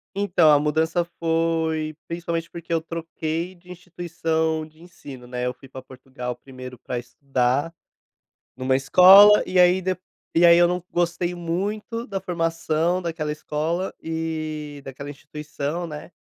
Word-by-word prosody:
Então 180 Hz, -5 st, +4 dB
a 145 Hz, -, +6 dB
mudança 160 Hz, +3 st, +1 dB
foi 160 Hz, -1 st, 0 dB
principalmente 170 Hz, -1 st, -3 dB
porque 170 Hz, 0 st, -8 dB
eu 165 Hz, -, +2 dB
troquei 165 Hz, +1 st, -4 dB
de 180 Hz, 0 st, -19 dB
instituição 160 Hz, -3 st, -2 dB
de 155 Hz, +1 st, -20 dB
ensino, 140 Hz, -8 st, -12 dB
né? 125 Hz, 0 st, -3 dB
Eu 125 Hz, -, -1 dB
fui 135 Hz, +1 st, -16 dB
pra 130 Hz, 0 st, -9 dB
Portugal 130 Hz, -1 st, -7 dB
primeiro 130 Hz, -1 st, -11 dB
pra 125 Hz, -, -4 dB
estudar 130 Hz, +4 st, -1 dB, 0.8 s
numa 130 Hz, 0 st, +1 dB
escola 190 Hz, +9 st, +8 dB
e 185 Hz, -, 0 dB
aí 180 Hz, +1 st, +5 dB
de 185 Hz, 0 st, -1 dB, 0.4 s
e 170 Hz, -, +5 dB
aí 170 Hz, 0 st, +8 dB
eu 175 Hz, -, +6 dB
não 180 Hz, 0 st, -1 dB
gostei 175 Hz, 0 st, 0 dB
muito 205 Hz, +7 st, -3 dB
da 195 Hz, -2 st, -3 dB
formação 165 Hz, -1 st, 0 dB
daquela 165 Hz, -3 st, -3 dB
escola 155 Hz, +4 st, -3 dB
e 155 Hz, -2 st, -4 dB
daquela 135 Hz, +1 st, -8 dB
instituição, 150 Hz, +3 st, -5 dB
né? 150 Hz, +1 st, -8 dB
165 Hz, 145 wpm, -23 LUFS, 145-175 Hz, 0.8 s, escola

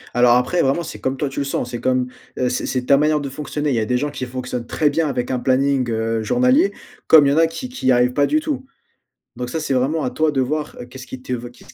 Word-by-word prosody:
Alors 120 Hz, 0 st, +5 dB
après, 125 Hz, +8 st, +2 dB
vraiment, 135 Hz, +6 st, +1 dB
c'est 165 Hz, -, -8 dB
comme 130 Hz, +1 st, -2 dB
toi 145 Hz, -, -1 dB
tu 135 Hz, -, -5 dB
le -, -, 0 dB
sens 125 Hz, -3 st, -3 dB
c'est 120 Hz, -, -5 dB
comme, 130 Hz, -1 st, +1 dB, 0.3 s
heu, 125 Hz, -, +1 dB
c'est 125 Hz, -, -2 dB
c'est 125 Hz, -1 st, -2 dB
ta 140 Hz, -, +5 dB
manière 150 Hz, +1 st, +2 dB
de 140 Hz, -1 st, -4 dB
fonctionner. 145 Hz, +1 st, -3 dB
Il -, -, +1 dB
y -, -, +1 dB
a 110 Hz, -, 0 dB
des 125 Hz, +3 st, +1 dB
gens 145 Hz, +3 st, -2 dB
qui 130 Hz, -2 st, -5 dB
fonctionnent 125 Hz, -1 st, -5 dB
très 150 Hz, +3 st, +1 dB
bien 160 Hz, +2 st, +1 dB
avec 125 Hz, -2 st, -2 dB
un 125 Hz, -, 0 dB
planning, 130 Hz, 0 st, +1 dB
heu, 115 Hz, 0 st, -1 dB
journalier 255 Hz, -, +3 dB, 0.4 s
comme 155 Hz, -3 st, +8 dB
il 140 Hz, -, +3 dB
y -, -, +2 dB
en -, -, 0 dB
a 165 Hz, 0 st, +5 dB
qui 165 Hz, +10 st, -6 dB
qui 250 Hz, -, 0 dB
arrivent 125 Hz, 0 st, +3 dB
pas 145 Hz, +2 st, +2 dB
du 310 Hz, -, +2 dB
tout, 295 Hz, -4 st, -4 dB, 0.7 s
donc 125 Hz, 0 st, -4 dB
ça, 160 Hz, -, -2 dB
c'est 140 Hz, -, -1 dB
vraiment 135 Hz, +5 st, +1 dB
à -, -, 0 dB
toi 155 Hz, -1 st, +1 dB
de 135 Hz, -2 st, 0 dB
voir. 150 Hz, +4 st, -2 dB
Qu'est-ce 130 Hz, 0 st, -10 dB
qui 130 Hz, -, -8 dB
t 125 Hz, -, -4 dB, 0.2 s
qu'est-ce -, -, -17 dB
135 Hz, 280 wpm, -20 LUFS, 125-155 Hz, 0.7 s, comme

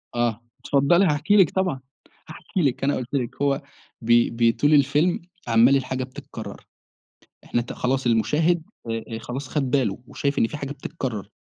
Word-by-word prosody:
آه، 120 Hz, -2 st, 0 dB, 0.2 s
اتفضلي 145 Hz, +7 st, +3 dB
هأحكي 155 Hz, +5 st, +2 dB
لِك 190 Hz, -7 st, +6 dB
طبعًا، 185 Hz, -8 st, -1 dB, 0.5 s
هأحكي 185 Hz, -, -4 dB
لِك، 135 Hz, -5 st, 0 dB
أنا 140 Hz, +1 st, +2 dB
قُلت 130 Hz, +1 st, -6 dB
لِك 125 Hz, -3 st, -2 dB
هو 140 Hz, 0 st, +1 dB, 0.4 s
بي 120 Hz, +1 st, +4 dB
بيطول 115 Hz, +6 st, +2 dB
الفيلم 145 Hz, +5 st, +3 dB, 0.3 s
عمّال 120 Hz, +3 st, +5 dB
الحاجة 130 Hz, -1 st, -1 dB
بتتكرر 130 Hz, 0 st, -9 dB, 0.8 s
إحنا 120 Hz, -, -1 dB
ت 120 Hz, -, -7 dB
خلاص 130 Hz, +1 st, -1 dB
المشاهد 150 Hz, +9 st, +2 dB, 0.3 s
آآ، 115 Hz, 0 st, -4 dB
خلاص 130 Hz, +4 st, -6 dB
خد 135 Hz, -3 st, -2 dB
باله 120 Hz, -9 st, +1 dB
وشايف 140 Hz, 0 st, -2 dB
إن 115 Hz, -, +3 dB
فيه 150 Hz, -, -6 dB
حاجة 140 Hz, -1 st, -5 dB
بتتكرر، 130 Hz, -, -5 dB
135 Hz, 155 wpm, -24 LUFS, 120-145 Hz, 0.8 s, لِك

